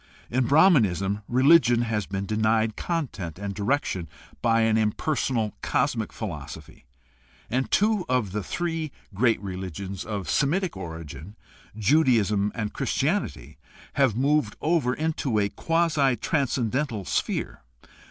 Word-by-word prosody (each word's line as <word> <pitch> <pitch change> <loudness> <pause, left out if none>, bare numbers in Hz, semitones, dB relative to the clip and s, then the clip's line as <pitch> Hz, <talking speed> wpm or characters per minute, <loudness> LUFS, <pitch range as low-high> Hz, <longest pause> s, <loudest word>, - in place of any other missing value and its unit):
In 125 0 +1
Brahmanism 105 - +4
religion 130 -2 +5
has 110 -4 -2
been 95 +1 -3
denied 110 +1 +1
content 120 - -3
and 100 0 -4
direction 100 - -1 0.3
by 115 -1 +3
an 110 -1 +3
impersonal 110 +1 0
cosmic 125 -4 0
philosophy, 75 - -8 0.7
and 130 +3 0
two 210 -1 +2
of 125 -7 +1
the 105 +2 -2
three 165 - -3 0.2
great 115 +3 +2
religions 95 0 -5
of 100 -4 -4
Semitic 165 - +1
origin 80 0 -8 0.2
— - - -22
Judaism 110 -5 +3
and 110 -3 -3
Christianity— - - -2 0.3
have 135 -7 +2
moved 135 -3 +1
over 150 -6 +1
into 155 -7 -1
a 100 -1 +2
quasi 155 -3 +1
transcen 130 -3 0
dental 130 -6 -1
personal - - -12
sphere. - - -2
115 Hz, 125 wpm, -25 LUFS, 100-140 Hz, 0.7 s, religion